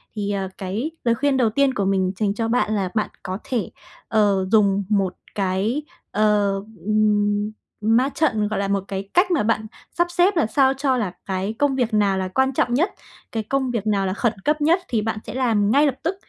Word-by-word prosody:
Thì, 205 -1 -2
ờ, 195 -1 -2
cái 210 - -3
lời 235 -1 +2
khuyên 275 +2 +1
đầu 235 -4 +3
tiên 270 +3 +2
của 200 -5 -1
mình 190 -1 +1
dành 205 -2 +1
cho 225 +2 -2
bạn 225 -2 +1
là 195 -3 -1
bạn 215 - 0
có 185 0 -4
thể, 250 -8 -2 0.4
ờ, 200 -3 +2
dùng 200 -2 +3
một 195 -3 +1 0.2
cái, 200 +8 0 0.3
ờ, 210 -1 +2 0.3
ừm, 210 -1 +2 0.4
ma 230 +5 +3
trận, 240 -9 +1
gọi 215 - -2
là, 200 - -1
một 200 -1 0
cái 195 0 -5
cách 365 +1 +3
mà 310 -10 +2
bạn 220 0 0 0.3
sắp 345 0 +1
xếp 355 +3 +3
làm 305 - +3
sao 265 +3 +3
cho 270 -1 0
là 205 -7 -2
cái 190 +2 -2
công 285 -2 +2
việc 240 -4 0
nào 200 -2 +2
là 190 - -1
quan 265 +8 +1
trọng 240 -1 +1
nhất, 335 +10 +2 0.4
cái 225 -2 -2
công 265 +1 -1
việc 225 -3 -2
nào 200 -2 +1
là 185 - -1
khẩn 225 +2 0
cấp 300 0 +1
nhất 335 +5 +4
thì 230 -4 0
bạn 215 0 -2
sẽ - - -7
làm 225 -5 +1
ngay 285 +4 +5
lập 275 - +1
tức. 335 +4 -1
215 Hz, 220 wpm, -22 LUFS, 200-265 Hz, 0.4 s, ngay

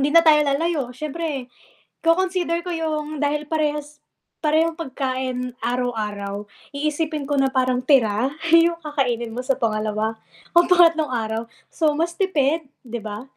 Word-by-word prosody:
hindi 275 - +2
na 335 0 +7
tayo 305 -1 +7
lalayo 290 -2 0
siyempre 300 -3 -4 0.6
ko-consider 345 0 +1
ko 355 - -2
yung 310 -2 -3
dahil 295 +1 0
parehas 300 -1 -2 0.4
parehong 320 +2 +2
pagkain 255 -4 -3
araw-araw, 210 -4 -3 0.2
iisipin 300 0 -2
ko 285 - +2
na 270 - +4
parang 255 -1 +2
tira 250 -4 +3 0.2
yung 335 +1 +6
kakainin 250 -6 -1
mo 230 - -7
sa 260 +1 +1
pangalawa 220 -2 -1 0.3
o 345 0 +5
pangatlong 335 -3 +5
araw. 225 -1 -2 0.3
So, 310 -2 +1
mas 335 +3 -2
tipid, 320 -5 +1 0.2
di 235 -1 -5
ba? 215 0 -6
290 Hz, 140 wpm, -22 LUFS, 245-320 Hz, 0.6 s, na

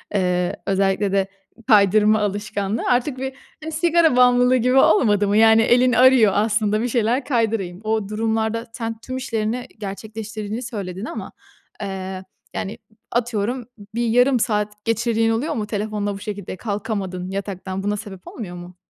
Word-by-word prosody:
eee, 180 -2 0
özellikle 195 0 +1
de 195 -1 +1 0.4
kaydırma 215 -1 +5
alışkanlığı 205 +1 -2
artık 250 +2 +1
bir, 265 0 -3 0.3
hani, 320 - -5
sigara 325 -2 +3
bağımlılığı 250 0 +5
gibi 250 +2 +2
olmadı 210 -5 +4
mı? 205 +1 +2
Yani, 225 0 +6
elin 245 +2 +4
arıyor 250 -5 +6
aslında 215 0 +1
bir 245 - 0
şeyler 240 +2 +1
kaydırayım. 220 -7 -1
O 215 -2 -1
durumlarda 220 +1 -1
sen 225 -1 -4
tüm 255 +2 -6
işlerini 245 -1 -2
gerçekleştirdiğini 215 +2 -6
söyledin 200 -4 -5
ama, 220 -5 -6 0.5
eee, 190 -1 -5 0.3
yani, 205 +4 -4 0.3
atıyorum 240 +1 -1 0.3
bir 235 0 0
yarım 245 +3 +4
saat 210 -1 -1
geçirdiğin 225 0 +1
oluyor 280 +8 -1
mu 215 -2 -3
telefonla 210 -1 -2
bu - - -8
şekilde? 200 -3 -6
Kalkamadın 200 -4 -4
yataktan. 195 -1 -4
Buna 205 +1 -1
sebep 200 -3 -10
olmuyor 180 -6 -7
mu? 175 +1 -10
215 Hz, 145 wpm, -21 LUFS, 200-235 Hz, 0.5 s, Yani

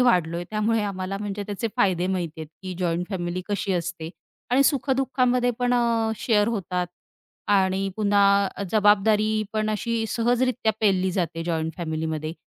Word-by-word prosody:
वाढलोय 175 -8 +2
त्यामुळे 215 +1 +1
आम्हाला 195 -1 -3
म्हणजे 205 0 -4
त्याचे 210 +3 -3
फायदे 185 -5 +2
माहिती 175 -4 -3
आहेत, 155 - -7
की 185 -1 -5
जॉइंट 175 0 -1
फॅमिली 180 -1 -3
कशी 200 -1 -1
असते 170 -2 -3 0.4
आणि 260 +3 +5
सुखदुःखामध्ये 260 -3 +2
पण 245 0 +2
अ, 230 -2 +1
शेअर 210 -2 +2
होतात 180 -5 -2 0.6
आणि 195 -1 +2
पुन्हा 200 -1 +3
जबाबदारी 215 +1 +3
पण 215 0 0
अशी 225 +1 -1
सहजरित्या 240 -1 +1
पेलली 190 -3 +2
जाते 165 -3 -2
जॉइंट 160 -1 -1
फॅमिलीमध्ये. 160 -2 -3
200 Hz, 140 wpm, -24 LUFS, 180-225 Hz, 0.6 s, आणि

